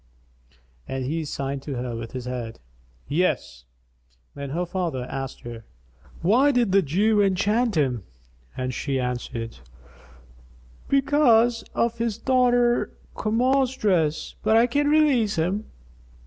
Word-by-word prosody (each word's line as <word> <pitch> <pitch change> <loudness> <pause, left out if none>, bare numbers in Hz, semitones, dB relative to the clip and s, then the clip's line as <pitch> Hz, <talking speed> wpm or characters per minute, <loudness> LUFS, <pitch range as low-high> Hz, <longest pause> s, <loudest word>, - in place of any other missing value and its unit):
And 130 -1 -3
he 160 +4 -2
signed 140 -1 -4
to 140 -1 -5
her 120 -1 -4
with 115 0 -7
his 125 -1 -5
head, 125 -3 -5 0.5
"Yes." 140 - -1 0.7
Then 140 -1 -6
her 170 +6 -2
father 175 -7 -2
asked 135 +1 -6
her, 115 -1 -8 0.6
"Why 240 +11 +4
did 245 -7 +2
the 195 +1 +5
Jew 205 +7 +2
enchant 205 +3 +1
him?"; 130 -6 +1 0.6
and 130 0 -2
she 135 +1 -2
answered, 120 - -4 1.3
"Because 245 -5 +3
of 235 0 0
his 230 -3 -1
daughter 245 -1 +2 0.2
Kamar's 255 +4 +1
dress; 165 -7 +1
but 220 - +3
I 230 - +6
can 290 +4 +1
release 285 -9 +3
him." 185 +7 -1
185 Hz, 125 wpm, -24 LUFS, -, 1.3 s, I